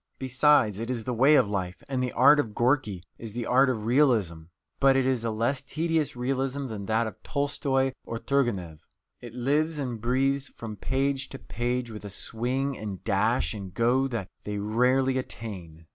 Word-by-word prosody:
Besides, 130 -5 +3
it 115 +1 -4
is 120 -3 -2
the 125 - -2
way 135 +6 +5
of 130 -7 +4
life, 95 -3 -4
and 130 -2 -1
the 125 -1 -1
art 145 +1 +6
of 110 -7 -2
Gorky 120 -7 +1 0.2
is 115 -3 -8
the 120 0 -3
art 130 +2 +4
of 110 -4 -2
realism. 115 - +2 0.3
But 135 -1 +5
it 135 -1 +2
is 130 -3 +1
a 115 - 0
less 115 +5 0
tedious 160 0 -1
realism 135 +2 -1
than 105 -5 -6
that 110 +1 +2
of 110 - -7
Tolstoy 140 -2 0
or 115 - -5
Turgenev. 110 - -1 0.4
It 120 -1 -10
lives 150 +6 0
and 125 -6 -4
breathes 135 +3 +1
from 110 -2 -6
page 135 +3 -1
to 135 - -7
page 120 0 -3
with 105 -1 -8
a 100 - -6
swing 125 +7 -2
and 105 -5 -6
dash 75 +5 +1
and 95 -4 -8
go 125 +3 +2
that 115 -7 -4 0.2
they 105 0 -4
rarely 125 +5 +2
attain. 90 -9 -8
125 Hz, 185 wpm, -27 LUFS, 110-135 Hz, 0.4 s, art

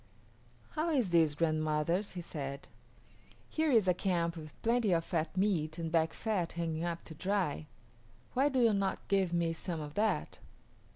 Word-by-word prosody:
"How 320 +2 -1
is 255 - +1
this, 160 -3 +4
grandmothers?" 155 +4 0
he 180 - -4
said. 140 -4 -6 0.8
"Here 315 0 0
is 225 -8 +4
a 180 - +5
camp 175 -2 0
with 155 -2 -10
plenty 230 -4 +3
of 165 -1 +2
fat 165 0 -2
meat 170 -6 +1
and 165 -1 -3
back 165 -1 +2
fat 200 -7 -1
hanging 165 -1 -2
up 170 -1 -3
to 160 - -9
dry; 180 -3 -1 0.7
why 270 +3 +3
do 265 -2 +1
you 230 -2 +5
not 195 -1 -1
give 195 -3 +2
me 170 -1 +1
some 165 0 -4
of 150 -1 -6
that?" 215 +4 0
170 Hz, 170 wpm, -33 LUFS, 160-200 Hz, 0.8 s, a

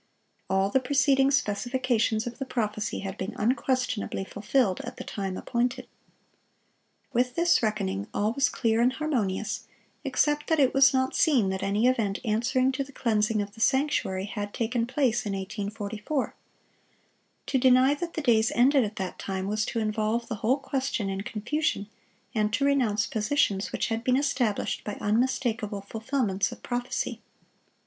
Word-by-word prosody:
All 190 +1 +2
the 265 - +4
preceding 270 +1 +3
specifications 240 -2 +1
of 240 0 -6
the 270 - -2
prophecy 215 -4 -2
had 195 -1 -6
been 195 +4 -4
unquestionably 250 -4 0
fulfilled 205 0 0
at 245 +2 -8
the - - -6
time 195 -2 -4
appointed. 240 +1 -1 1.3
With 250 +1 +1
this 340 0 +3
reckoning, 205 -2 -1
all 210 +2 0
was 275 +2 +2
clear 225 -2 +1
and 250 +2 +3
harmonious, 220 -9 -2 0.4
except 295 +1 +1
that 320 -1 +2
it 265 -3 +4
was 270 0 +6
not 260 0 +1
seen 260 - +3
that 190 0 -2
any 205 +4 +1
event 225 -6 +2
answering 255 +4 +2
to 270 +1 -2
the 275 - -13
cleansing 215 -4 +1
of 200 0 -10
the 225 - -11
sanctuary 265 -9 +1
had 205 0 -5
taken 230 0 0
place 250 -2 +1
in 200 - -2
1844. 210 +6 -3 1.1
To 270 - +1
deny 260 +2 +5
that 335 +3 -5
the 315 - -1
days 230 -3 +3
ended 265 +2 +5
at 215 0 -4
that 190 -3 -5
time 190 -1 -3
was 215 +1 -1
to - - -3
involve 220 +1 0
the 225 - -4
whole 250 +5 +3
question 265 -7 -2
in 195 0 -3
confusion, 215 +1 -2 0.5
and 215 -1 +1
to 280 - +2
renounce 240 -7 +2
positions 215 -3 0
which - - -1
had 225 0 -2
been 255 +1 +3
established 255 -7 0
by 210 - -4
unmistakable 225 -2 0
fulfilments 220 -2 -1
of - - -11
prophecy. 245 0 -3
230 Hz, 160 wpm, -27 LUFS, 210-260 Hz, 1.3 s, was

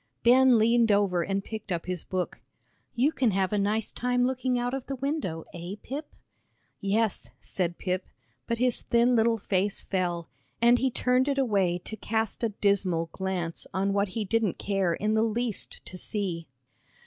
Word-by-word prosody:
Ben 255 +1 +6
leaned 230 0 +4
over 200 -4 +3
and 195 +3 -1
picked 215 -2 -7
up 170 -2 -2
his 180 -2 -3
book. 185 -1 -3 0.5
"You 260 +6 +3
can 260 -6 +2
have 190 0 0
a 210 - +2
nice 210 +2 0
time 245 0 +1
looking 255 -1 0
out 245 +1 -1
of 270 -2 -4
the 275 - -3
window, 265 - -3
eh, 175 +3 -6
Pip?" 290 +4 -5 0.7
"Yes," 210 +1 0
said 175 -2 -2
Pip, 185 0 -2 0.4
but 230 - 0
his 250 0 +1
thin 240 +1 +3
little 230 0 +3
face 200 -1 -1
fell, 175 -3 -1 0.3
and 240 +1 +5
he 265 - +2
turned 250 +2 +2
it 280 -1 +1
away 200 -9 +2
to 220 - -5
cast 220 +1 -2
a 230 - +2
dismal 195 -5 +1
glance 185 -3 -3
on 195 +1 +1
what 200 +1 +2
he 215 - 0
didn't 220 -2 +1
care 195 -4 0
in 215 +1 0
the 220 - +3
least 225 0 -2
to 185 - -6
see. 180 -6 -2
210 Hz, 175 wpm, -28 LUFS, 190-240 Hz, 0.7 s, Ben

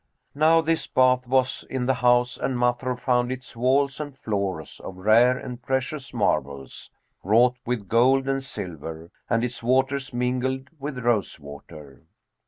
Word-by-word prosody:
Now 160 +3 +4
this 165 0 -1
bath 130 -1 +3
was 130 0 +1
in 130 -2 -2
the 130 - +3
house 125 0 +2
and 130 - -2
Masrur 125 +1 0
found 125 -1 +1
its 130 -1 -7
walls 135 +3 +1
and 145 -3 -6
floors 100 -8 -3
of 95 - -9
rare 115 +6 +4
and 125 -2 -8
precious 130 +1 -3
marbles, 70 - -2 0.3
wrought 120 +5 +4
with 120 -5 -2
gold 130 +5 +3
and 135 0 0
silver, 80 - -7 0.2
and 115 0 +1
its 125 0 -3
waters 130 +3 +1
mingled 130 +2 -2
with 140 -1 -5
rose 115 -8 0
water. 70 +1 -12
125 Hz, 150 wpm, -24 LUFS, 110-130 Hz, 0.3 s, Now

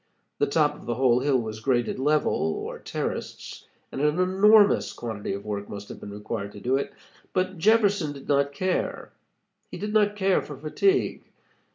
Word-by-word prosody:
The - - +3
top 150 0 +2
of 150 - -14
the 120 - -1
whole 125 -1 +3
hill 135 0 +2
was 110 -2 -4
graded 120 +1 0
level, 150 +3 +2
or 80 - -2
terraced, - - -5 0.2
and 135 - -4
an 150 +2 +2
enormous 205 +3 +5
quantity 110 -4 -5
of 100 +1 -6
work 100 -1 -4
must 100 0 -8
have - - -8
been - - -9
required 105 0 -5
to - - -9
do 125 +5 0
it, 140 - -2 0.4
but 185 -1 -1
Jefferson 205 -5 +3
did 140 -1 -11
not 140 0 +2
care. 185 +6 -2 0.6
He - - -7
did 210 +1 -4
not 210 -1 +3
care 195 -2 +2
for 145 - -9
fatigue. 380 - +1
145 Hz, 180 wpm, -26 LUFS, 120-185 Hz, 0.6 s, enormous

